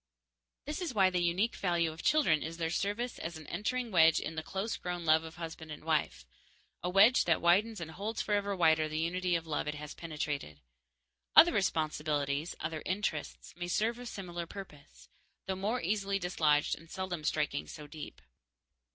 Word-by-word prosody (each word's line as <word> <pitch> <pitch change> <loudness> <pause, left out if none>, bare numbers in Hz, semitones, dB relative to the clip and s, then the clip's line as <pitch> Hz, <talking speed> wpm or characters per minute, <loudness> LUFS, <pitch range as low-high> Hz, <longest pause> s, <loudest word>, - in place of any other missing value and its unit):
_ - - -59
This 300 +5 -4
is 325 -9 -3
why 190 -2 +5
the 180 -1 +1
unique 180 +7 +1
value 170 -3 +1
of 160 - -9
children 190 - +3
is 165 +1 -5
their 165 -1 -1
service 205 +7 -2
as 165 0 -5
an 155 - -11
entering 235 - -2
wedge 165 -3 +6
in 160 - -4
the 160 - -3
close 195 +7 -3
grown 175 -1 -4
love 160 0 +5
of 160 0 -9
husband 165 -2 -7
and 150 - -8
wife, 155 - 0 0.6
a 180 - -1
wedge 205 +7 +6
that 165 -2 +3
widens 200 +5 +3
and 160 -1 -6
holds 210 +7 -4
forever 205 -1 0
wider 160 -3 +3
the 155 - -3
unity 175 +2 0
of 165 -1 -2
love 155 -2 -2
it 150 - -2
has 150 0 -7
penetrated. 150 - -4 0.8
Other 345 0 +9
responsibilities, 155 -4 0
other 155 -1 -3
interests, 185 -5 -3
may 175 0 -4
serve 225 +6 0
a 245 - -7
similar 175 -6 -5
purpose, 165 -7 -11 0.4
though 190 - -2
more 210 +6 -1
easily 200 +1 0
dislodged 155 -6 +2
and 165 0 -16
seldom 185 -4 -4
striking 150 - -1
so 150 - -9
deep. 150 +1 -9
170 Hz, 185 wpm, -32 LUFS, 155-195 Hz, 0.8 s, Other